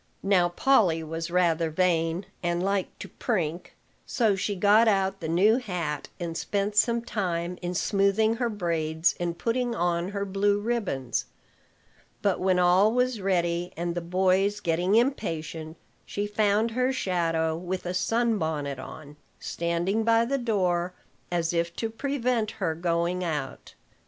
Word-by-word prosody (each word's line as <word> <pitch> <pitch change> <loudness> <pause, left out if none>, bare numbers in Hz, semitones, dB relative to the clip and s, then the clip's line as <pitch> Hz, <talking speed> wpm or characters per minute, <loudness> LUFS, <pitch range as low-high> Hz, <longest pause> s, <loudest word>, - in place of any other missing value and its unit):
Now 185 -3 +3
Polly 175 -5 +3
was 165 +2 -4
rather 170 -2 +2
vain, 165 +1 +1 0.2
and 175 0 -1
liked 195 -1 -1
to - - -6
prink; 175 -7 -3 0.3
so 220 -5 +1
she 200 +2 -2
got 210 +4 +5
out 195 -2 +1
the 160 - -4
new 200 +8 +4
hat, 175 - -4
and 170 -2 -4
spent 205 +3 -2
some 235 +2 +3
time 180 -5 -2
in 175 0 -3
smoothing 200 +4 +2
her 240 -1 0
braids 165 -5 0
and 170 -1 -2
putting 240 +1 -1
on 175 0 0
her 200 0 -3
blue 200 +1 +1
ribbons. 200 - -2 1.0
But - - +1
when 185 -1 +2
all 180 +4 +4
was 250 -2 0
ready, 175 -2 0
and 170 0 -2
the 175 - -3
boys 190 +3 +1
getting 175 +2 +1
impatient, 165 - -1 0.3
she 205 - -3
found 210 +2 +1
her 255 +3 +1
shadow, 165 -8 0
with 180 +2 -4
a 180 - -2
sun 225 +4 +1
bonnet 145 -4 -2
on, 145 +2 -10 0.2
standing 170 +6 -1
by 230 +1 +4
the 275 +3 -1
door, 180 -6 0 0.4
as 170 -1 0
if 170 0 -1
to 225 -1 -3
prevent 245 -3 -1
her 175 -5 0
going 170 +2 -1
out. 150 -6 -4
180 Hz, 150 wpm, -27 LUFS, 170-210 Hz, 1.0 s, got